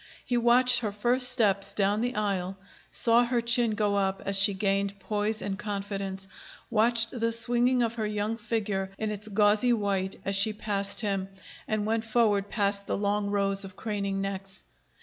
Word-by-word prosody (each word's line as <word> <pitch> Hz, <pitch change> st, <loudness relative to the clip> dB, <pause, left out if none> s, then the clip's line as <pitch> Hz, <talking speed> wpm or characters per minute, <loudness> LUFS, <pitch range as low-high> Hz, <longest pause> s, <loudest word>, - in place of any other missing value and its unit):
He 245 Hz, -, -1 dB
watched 245 Hz, +1 st, +4 dB
her 220 Hz, -4 st, -2 dB
first 245 Hz, +5 st, +2 dB
steps 200 Hz, -5 st, +1 dB
down 205 Hz, +1 st, +1 dB
the 245 Hz, +1 st, -2 dB
aisle, 195 Hz, -3 st, -2 dB, 0.3 s
saw 235 Hz, +1 st, +3 dB
her 240 Hz, 0 st, 0 dB
chin 235 Hz, -1 st, +1 dB
go 210 Hz, -1 st, +1 dB
up 195 Hz, -1 st, 0 dB
as 195 Hz, -, -1 dB
she 195 Hz, +1 st, +4 dB
gained 200 Hz, 0 st, -1 dB
poise 210 Hz, +2 st, -2 dB
and 195 Hz, 0 st, -4 dB
confidence, 195 Hz, -2 st, -4 dB, 0.4 s
watched 230 Hz, +1 st, +2 dB
the 230 Hz, -2 st, -1 dB
swinging 240 Hz, +2 st, +1 dB
of 230 Hz, -1 st, -1 dB
her 220 Hz, -2 st, -2 dB
young 210 Hz, +1 st, -2 dB
figure 210 Hz, -4 st, -2 dB
in 220 Hz, -1 st, -2 dB
its 210 Hz, 0 st, -5 dB
gauzy 210 Hz, +3 st, +3 dB
white 195 Hz, -3 st, -1 dB
as 195 Hz, -, -1 dB
she 200 Hz, +2 st, +3 dB
passed 200 Hz, -1 st, 0 dB
him 195 Hz, -3 st, -2 dB, 0.4 s
and 215 Hz, -1 st, -1 dB
went 225 Hz, +1 st, 0 dB
forward 215 Hz, -3 st, +1 dB
past 200 Hz, -2 st, -1 dB
the -, -, -1 dB
long 205 Hz, 0 st, 0 dB
rows 195 Hz, -1 st, 0 dB
of 190 Hz, -1 st, -8 dB
craning 200 Hz, -2 st, -3 dB
necks. 195 Hz, 0 st, -5 dB
210 Hz, 175 wpm, -28 LUFS, 195-230 Hz, 0.4 s, watched